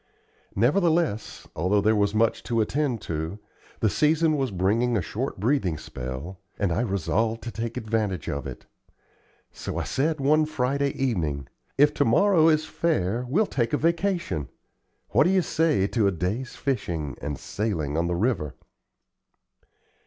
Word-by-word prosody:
Nevertheless, 155 Hz, -, +1 dB
although 90 Hz, +6 st, +2 dB
there 110 Hz, +2 st, +3 dB
was 100 Hz, 0 st, +1 dB
much 115 Hz, +1 st, +2 dB
to 115 Hz, -1 st, 0 dB
attend 125 Hz, +1 st, 0 dB
to, 80 Hz, +4 st, -3 dB, 0.4 s
the 110 Hz, -, +4 dB
season 155 Hz, +1 st, +3 dB
was 135 Hz, -3 st, 0 dB
bringing 110 Hz, +6 st, +1 dB
a -, -, +2 dB
short -, -, -4 dB
breathing 105 Hz, -, +1 dB
spell, 70 Hz, +6 st, -7 dB, 0.2 s
and 100 Hz, -4 st, 0 dB
I 95 Hz, -, +1 dB
resolved 110 Hz, +2 st, 0 dB
to 120 Hz, -, -5 dB
take 115 Hz, +3 st, -4 dB
advantage 110 Hz, -, -1 dB
of 70 Hz, -1 st, -3 dB
it. -, -, -9 dB, 0.9 s
So -, -, -6 dB
I -, -, -1 dB
said 155 Hz, +3 st, 0 dB
one 150 Hz, +3 st, +3 dB
Friday 140 Hz, -1 st, 0 dB
evening: 80 Hz, -, -1 dB, 0.3 s
"If 145 Hz, +2 st, +5 dB
to -, -, +2 dB
morrow 165 Hz, -, +5 dB
is 155 Hz, 0 st, +2 dB
fair, 125 Hz, -, -1 dB
we'll 200 Hz, +11 st, +3 dB
take 120 Hz, -, -1 dB
a -, -, +4 dB
vacation. 170 Hz, -, 0 dB, 0.6 s
What -, -, +4 dB
do -, -, +4 dB
you 190 Hz, -1 st, +3 dB
say 160 Hz, -14 st, +2 dB
to 110 Hz, -4 st, +2 dB
a -, -, +3 dB
day's 100 Hz, +9 st, -3 dB
fishing 85 Hz, -, -2 dB
and 70 Hz, -1 st, -3 dB
sailing 85 Hz, -9 st, -2 dB
on 85 Hz, +1 st, +1 dB
the 85 Hz, -, 0 dB
river?" 85 Hz, -, 0 dB
115 Hz, 155 wpm, -26 LUFS, 95-145 Hz, 0.9 s, If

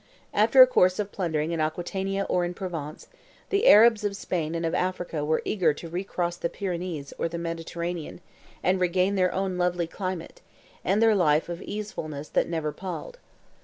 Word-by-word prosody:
After 225 Hz, +5 st, +7 dB
a -, -, +8 dB
course 185 Hz, -7 st, +3 dB
of 205 Hz, -1 st, -3 dB
plundering 160 Hz, -4 st, -1 dB
in 165 Hz, -2 st, -1 dB
Aquitania 190 Hz, +5 st, -2 dB
or 180 Hz, -, +1 dB
in 175 Hz, 0 st, -3 dB
Provence, 165 Hz, -5 st, -6 dB, 0.4 s
the 405 Hz, +4 st, +2 dB
Arabs 220 Hz, 0 st, +7 dB
of 205 Hz, -1 st, -1 dB
Spain 165 Hz, -5 st, -2 dB
and 165 Hz, 0 st, -2 dB
of 165 Hz, -, -1 dB
Africa 180 Hz, -4 st, -2 dB
were 155 Hz, +1 st, 0 dB
eager 170 Hz, -8 st, +2 dB
to 165 Hz, -, -8 dB
recross 175 Hz, -1 st, -3 dB
the 170 Hz, -, -2 dB
Pyrenees 175 Hz, -7 st, -4 dB
or 165 Hz, -, 0 dB
the 170 Hz, -, -5 dB
Mediterranean, 170 Hz, 0 st, -4 dB, 0.4 s
and 185 Hz, 0 st, +2 dB
regain 180 Hz, +2 st, +2 dB
their 185 Hz, -2 st, +2 dB
own 190 Hz, -1 st, -2 dB
lovely 175 Hz, -1 st, +1 dB
climate, 185 Hz, 0 st, -6 dB, 0.4 s
and 205 Hz, +4 st, +2 dB
their 225 Hz, -1 st, +5 dB
life 160 Hz, -5 st, +2 dB
of 170 Hz, 0 st, -4 dB
easefulness 155 Hz, -9 st, -6 dB
that -, -, +2 dB
never 160 Hz, -3 st, -2 dB
palled. 195 Hz, -, -7 dB
180 Hz, 175 wpm, -26 LUFS, 165-195 Hz, 0.4 s, a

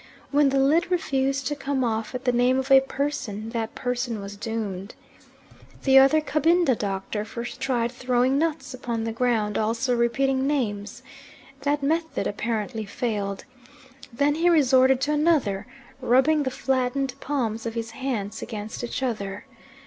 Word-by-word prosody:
When 290 Hz, -1 st, +4 dB
the 275 Hz, -, +1 dB
lid 300 Hz, +7 st, +3 dB
refused 275 Hz, -6 st, 0 dB
to 295 Hz, -, -1 dB
come 275 Hz, -2 st, -1 dB
off 225 Hz, 0 st, -2 dB
at 255 Hz, -, -5 dB
the 250 Hz, -, +4 dB
name 245 Hz, +2 st, +3 dB
of 265 Hz, +1 st, -2 dB
a 270 Hz, 0 st, +9 dB
person, 270 Hz, -6 st, -3 dB
that 230 Hz, -1 st, -3 dB
person 245 Hz, -2 st, -2 dB
was 200 Hz, 0 st, -7 dB
doomed. 205 Hz, -3 st, -5 dB, 0.9 s
The 270 Hz, -1 st, +7 dB
other 275 Hz, +4 st, +5 dB
Cabinda 310 Hz, -1 st, +2 dB
doctor 200 Hz, 0 st, -3 dB
first 235 Hz, +2 st, -7 dB
tried 240 Hz, -3 st, 0 dB
throwing 255 Hz, +2 st, +1 dB
nuts 320 Hz, -3 st, -2 dB
upon 235 Hz, -3 st, -3 dB
the 225 Hz, -, -2 dB
ground, 225 Hz, -3 st, 0 dB
also 230 Hz, +4 st, 0 dB
repeating 265 Hz, +3 st, +1 dB
names. 215 Hz, -8 st, -2 dB, 0.6 s
That 285 Hz, 0 st, 0 dB
method 320 Hz, +3 st, 0 dB
apparently 220 Hz, +1 st, -2 dB
failed. 205 Hz, -2 st, -3 dB, 0.7 s
Then 285 Hz, +5 st, +2 dB
he 335 Hz, +3 st, +2 dB
resorted 265 Hz, -4 st, +4 dB
to 295 Hz, -, +1 dB
another, 295 Hz, -11 st, +1 dB, 0.3 s
rubbing 265 Hz, +5 st, +3 dB
the 270 Hz, -, 0 dB
flattened 260 Hz, 0 st, -1 dB
palms 230 Hz, -5 st, -2 dB
of 225 Hz, -, -5 dB
his 230 Hz, -1 st, -4 dB
hands 230 Hz, -6 st, -4 dB
against 215 Hz, +2 st, -6 dB
each 240 Hz, +2 st, -3 dB
other. 205 Hz, -5 st, -3 dB
250 Hz, 150 wpm, -25 LUFS, 225-275 Hz, 0.9 s, a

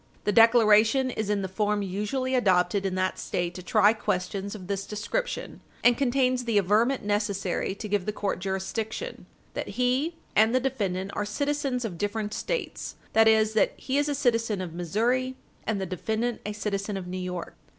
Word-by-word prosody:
The 210 Hz, -, +1 dB
declaration 225 Hz, +3 st, +5 dB
is 215 Hz, -3 st, -3 dB
in 205 Hz, -1 st, +1 dB
the -, -, -1 dB
form 205 Hz, +2 st, 0 dB
usually 210 Hz, +8 st, -2 dB
adopted 195 Hz, -4 st, +2 dB
in 185 Hz, -, -3 dB
that 185 Hz, 0 st, -1 dB
State 175 Hz, 0 st, -2 dB
to 185 Hz, -, -7 dB
try 205 Hz, +4 st, +4 dB
questions 195 Hz, -1 st, -2 dB
of 190 Hz, -3 st, -9 dB
this 195 Hz, +1 st, -3 dB
description, 215 Hz, -, -3 dB, 0.2 s
and 245 Hz, 0 st, +6 dB
contains 255 Hz, -1 st, +1 dB
the 230 Hz, -3 st, +1 dB
averment 215 Hz, +7 st, +2 dB
necessary 200 Hz, -2 st, -1 dB
to 210 Hz, -, -6 dB
give 205 Hz, -2 st, -1 dB
the -, -, +1 dB
court 205 Hz, -3 st, -2 dB
jurisdiction; 210 Hz, -, -4 dB, 0.3 s
that 200 Hz, -, -5 dB
he 255 Hz, +7 st, +1 dB, 0.2 s
and 220 Hz, +3 st, +5 dB
the -, -, +5 dB
defendant 200 Hz, -8 st, -2 dB
are 205 Hz, -, -1 dB
citizens 275 Hz, +3 st, -1 dB
of 175 Hz, -7 st, -5 dB
different 210 Hz, 0 st, -2 dB
States; -, -, -3 dB, 0.2 s
that 225 Hz, 0 st, +6 dB
is, 220 Hz, 0 st, +4 dB
that 220 Hz, -, +3 dB
he 270 Hz, +2 st, -1 dB
is 290 Hz, 0 st, +1 dB
a 290 Hz, -, 0 dB
citizen 230 Hz, -6 st, +1 dB
of 180 Hz, -3 st, -5 dB
Missouri, 235 Hz, +10 st, 0 dB, 0.3 s
and 220 Hz, -3 st, 0 dB
the 190 Hz, -, -2 dB
defendant 220 Hz, +6 st, -2 dB
a 210 Hz, -, -3 dB
citizen 205 Hz, -1 st, -2 dB
of 190 Hz, -, -5 dB
New 185 Hz, +1 st, -5 dB
York. 180 Hz, -1 st, -5 dB
210 Hz, 180 wpm, -27 LUFS, 195-245 Hz, 0.3 s, and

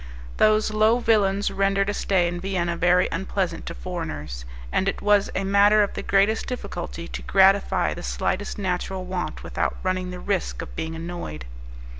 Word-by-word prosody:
Those 215 Hz, 0 st, +3 dB
low 215 Hz, +2 st, +4 dB
villains 205 Hz, -4 st, +2 dB
rendered 195 Hz, 0 st, +1 dB
a 205 Hz, -, 0 dB
stay 185 Hz, -3 st, +1 dB
in 175 Hz, 0 st, -3 dB
Vienna 175 Hz, -3 st, -1 dB
very 180 Hz, +1 st, +3 dB
unpleasant 185 Hz, -1 st, -2 dB
to 170 Hz, -, -5 dB
foreigners, 75 Hz, -, -5 dB, 0.3 s
and 190 Hz, -, +1 dB
it -, -, -4 dB
was 205 Hz, -1 st, +3 dB
a 195 Hz, -, 0 dB
matter 200 Hz, +2 st, +5 dB
of 200 Hz, -, -3 dB
the -, -, -4 dB
greatest 200 Hz, +3 st, +2 dB
difficulty 175 Hz, -8 st, -5 dB
to -, -, -6 dB
gratify 195 Hz, +1 st, +3 dB
the -, -, -8 dB
slightest 60 Hz, -, -2 dB
natural 185 Hz, -1 st, -2 dB
want 180 Hz, -1 st, -4 dB
without -, -, -2 dB
running 185 Hz, -1 st, -1 dB
the 180 Hz, 0 st, -6 dB
risk 195 Hz, -1 st, -2 dB
of -, -, -11 dB
being 160 Hz, 0 st, -4 dB
annoyed. 165 Hz, -, -6 dB
190 Hz, 170 wpm, -24 LUFS, 175-200 Hz, 0.3 s, matter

